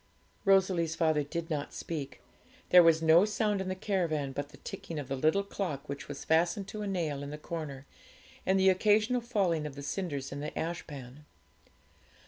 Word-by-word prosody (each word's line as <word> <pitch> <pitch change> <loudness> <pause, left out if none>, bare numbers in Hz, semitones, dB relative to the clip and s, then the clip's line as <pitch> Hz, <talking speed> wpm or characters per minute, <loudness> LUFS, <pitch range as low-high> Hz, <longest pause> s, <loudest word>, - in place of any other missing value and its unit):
Rosalie's 185 -4 +3
father 155 -3 +2
did 165 +3 -4
not 145 -2 -3
speak; 145 -5 -5 0.5
there 180 - +9
was 165 -1 +4
no 160 +3 +7
sound 210 -1 0
in 190 - -4
the 185 - -2
caravan 170 -8 -1
but 145 +1 -4
the 145 - -15
ticking 165 - -7
of 145 -3 -4
the 135 - -1
little 155 +9 +2
clock 180 -8 -4
which 140 0 -6
was 145 -1 -7
fastened 175 +5 +2
to 215 - -6
a 205 - -3
nail 165 -7 -2
in 140 - -5
the 150 - -6
corner, 150 -4 -6 0.6
and 190 +1 +2
the 190 0 +6
occasional 215 +6 +3
falling 190 -10 0
of 140 - -9
the 140 - -7
cinders 145 -4 -3
in 140 - -5
the 150 - -3
ashpan. 150 -4 -6
165 Hz, 185 wpm, -31 LUFS, 145-190 Hz, 0.6 s, there